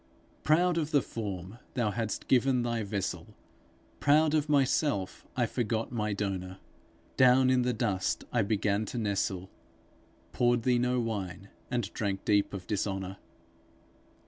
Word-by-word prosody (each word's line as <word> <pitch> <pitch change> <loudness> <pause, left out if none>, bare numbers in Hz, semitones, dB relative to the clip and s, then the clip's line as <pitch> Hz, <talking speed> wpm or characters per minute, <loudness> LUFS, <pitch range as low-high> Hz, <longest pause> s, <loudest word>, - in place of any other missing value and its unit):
Proud 170 +3 +3
of 155 -2 -2
the 145 -4 +3
form 100 -1 -6 0.2
thou 120 -5 +1
hadst 110 -1 -3
given 130 -1 +3
thy 115 -1 -1
vessel, 100 -2 -4 0.6
Proud 150 +2 +4
of 155 -1 +1
myself, 135 -7 +1
I 120 - +3
forgot 115 -1 -2
my 105 -3 -1
donor; 95 -2 -3 0.6
Down 130 0 +6
in 130 -1 +3
the 125 0 +1
dust 105 -5 -1
I 120 - +3
began 105 0 0
to 120 - -6
nestle, 100 -4 -1 0.8
Poured 120 -1 +2
thee 125 -1 +3
no 125 +1 +1
wine, 100 -4 -4 0.2
and 120 -5 -2
drank 100 -3 -2
deep 105 -1 +3
of 95 -3 -6
dishonour! 95 -1 -2
115 Hz, 140 wpm, -30 LUFS, 100-125 Hz, 0.8 s, Down